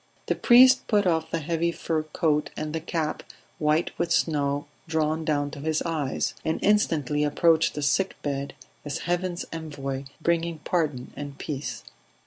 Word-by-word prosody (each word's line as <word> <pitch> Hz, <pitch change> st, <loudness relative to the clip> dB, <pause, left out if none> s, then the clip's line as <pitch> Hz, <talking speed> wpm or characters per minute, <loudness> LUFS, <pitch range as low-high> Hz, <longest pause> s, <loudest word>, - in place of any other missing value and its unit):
The -, -, +1 dB
priest 255 Hz, +1 st, +6 dB
put 205 Hz, -3 st, +3 dB
off 160 Hz, -2 st, +1 dB
the 165 Hz, -, -1 dB
heavy 165 Hz, +2 st, 0 dB
fur 165 Hz, -1 st, -1 dB
coat 155 Hz, -1 st, 0 dB
and 155 Hz, 0 st, -3 dB
the 160 Hz, -, -1 dB
cap 160 Hz, -1 st, -2 dB, 0.4 s
white 150 Hz, +2 st, +2 dB
with 170 Hz, -1 st, 0 dB
snow 145 Hz, -3 st, +1 dB, 0.2 s
drawn 160 Hz, 0 st, 0 dB
down 145 Hz, -2 st, 0 dB
to 145 Hz, -, -8 dB
his 155 Hz, +2 st, 0 dB
eyes, 155 Hz, -5 st, -1 dB
and 160 Hz, -, 0 dB
instantly 150 Hz, -8 st, +2 dB
approached 160 Hz, +2 st, +3 dB
the 150 Hz, -, -3 dB
sick 185 Hz, +7 st, +1 dB
bed 140 Hz, -1 st, -3 dB, 0.3 s
as 145 Hz, -, -4 dB
heaven's 175 Hz, 0 st, -1 dB
envoy 140 Hz, -4 st, -5 dB
bringing 170 Hz, 0 st, 0 dB
pardon 150 Hz, -8 st, -1 dB
and 145 Hz, -1 st, -7 dB
peace. 135 Hz, -6 st, -5 dB
155 Hz, 155 wpm, -26 LUFS, 145-170 Hz, 0.4 s, priest